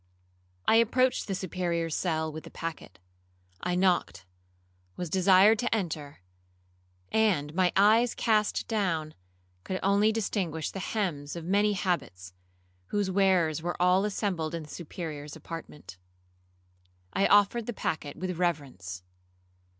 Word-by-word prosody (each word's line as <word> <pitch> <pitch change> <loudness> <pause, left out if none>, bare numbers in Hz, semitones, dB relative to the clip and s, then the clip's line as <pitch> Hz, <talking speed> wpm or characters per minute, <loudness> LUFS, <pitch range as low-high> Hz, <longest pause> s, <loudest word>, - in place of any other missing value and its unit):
'I 225 - +6
approached 250 +3 +2
the 195 - -2
Superior's 170 -3 -2
cell 160 -3 -1
with 155 +1 -8
the - - -10
packet. 165 - -7 0.6
I 180 0 -1
knocked, 175 - +1 0.7
was 175 -3 -5
desired 190 +3 +5
to 240 - +1
enter, 150 - -4 0.9
and, 180 -10 +2
my 180 0 +2
eyes 220 +4 +4
cast 215 -2 +1
down, 170 -8 -1 0.5
could 185 - -3
only 200 +2 +4
distinguish 190 -7 -2
the 195 - -6
hems 175 -9 -3
of 170 -1 -6
many 205 +3 +2
habits, 135 - -3 0.5
whose 205 -2 -1
wearers 180 -5 +2
were 175 +1 -3
all 180 +2 +4
assembled 190 -6 -2
in 165 - -5
the 150 - -13
Superior's 150 -3 -7
apartment. 150 - -9 1.1
I 195 - +3
offered 205 +3 +4
the - - -1
packet 155 -8 -3
with 180 0 -4
reverence. 130 - -3
180 Hz, 125 wpm, -28 LUFS, 155-200 Hz, 1.1 s, I